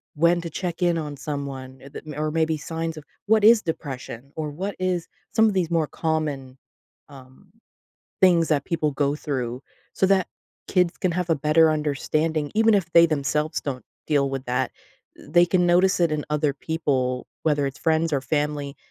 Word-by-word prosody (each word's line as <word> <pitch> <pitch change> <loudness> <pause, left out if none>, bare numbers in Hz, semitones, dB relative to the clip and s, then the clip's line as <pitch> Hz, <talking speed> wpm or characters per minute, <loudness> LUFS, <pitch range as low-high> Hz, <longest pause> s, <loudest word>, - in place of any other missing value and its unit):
when 170 +2 +3
to 170 - -5
check 175 +1 -4
in 175 -1 +2
on 150 -3 -4
someone, 135 -3 -6
uh, - - -10
the, 150 +1 -9
or 155 0 -1
maybe 160 -1 +1
signs 165 +1 -4
of 155 - -8 0.2
what 215 -1 +4
is 225 0 +7
depression 140 - -6
or 155 -2 -3
what 190 +6 -4
is 180 -2 -1 0.3
some 225 - +5
of 210 - +1
these 180 -3 0
more 165 -2 +2
common, 145 -5 -3 0.5
um, 135 +7 -16 0.7
things 175 -3 +5
that 145 -3 +1
people 155 -3 -1
go 140 +1 0
through 125 -4 -3 0.3
so 190 - +2
that 190 -2 +2 0.4
kids 180 -2 +2
can 185 - 0
have 180 -1 -2
a - - +5
better 155 +2 +4
understanding 155 +1 -1
even 225 0 +4
if 175 -4 0
they 170 0 +7
themselves 150 +1 -1
don't 130 -3 -5 0.2
deal 140 -2 +2
with 135 0 -4
that. 125 - 0 0.5
They 175 0 +3
can 180 0 +2
notice 180 +2 +4
it 170 -3 +3
in 150 -1 -2
other 150 -1 +1
people, 135 -5 -1 0.2
whether 145 -3 +1
it's 135 - -5
friends 160 0 +1
or 140 - +1
family, 145 -1 -2
155 Hz, 180 wpm, -24 LUFS, 140-170 Hz, 0.7 s, is